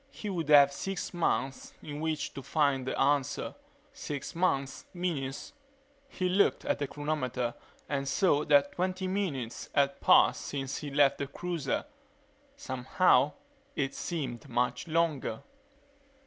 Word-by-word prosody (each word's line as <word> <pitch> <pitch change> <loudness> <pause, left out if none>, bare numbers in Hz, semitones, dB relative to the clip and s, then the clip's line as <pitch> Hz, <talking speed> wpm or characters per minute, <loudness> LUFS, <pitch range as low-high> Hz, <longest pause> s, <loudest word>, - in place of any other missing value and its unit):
He 210 -6 -6
would 165 -5 -3
have 140 -1 +7
six 195 +6 -4
months 135 -6 -1
in 145 -1 -6
which 155 -1 -2
to 135 - -6
find 140 -3 +1
the - - -2
answer. 140 0 +1 0.4
Six 150 - -5
months 140 -6 0
minus 150 -7 -3 0.5
He 185 -9 -2
looked 190 +3 +2
at - - 0
the 145 - -1
chronometer 130 -5 -2 0.3
and 140 -1 -2
saw 150 +1 +2
that 145 -1 +4
twenty 185 +1 -2
minutes 160 - -3
had 140 -1 +2
passed - - +5
since 135 -2 -4
he 150 - -5
left 140 0 +3
the 140 - -2
cruiser. 165 -2 -3 0.7
Somehow, 130 +2 +2 0.4
it 135 -1 -1
seemed 135 -9 -4
much 125 +4 -1
longer 155 -8 0
145 Hz, 135 wpm, -30 LUFS, 135-170 Hz, 0.7 s, have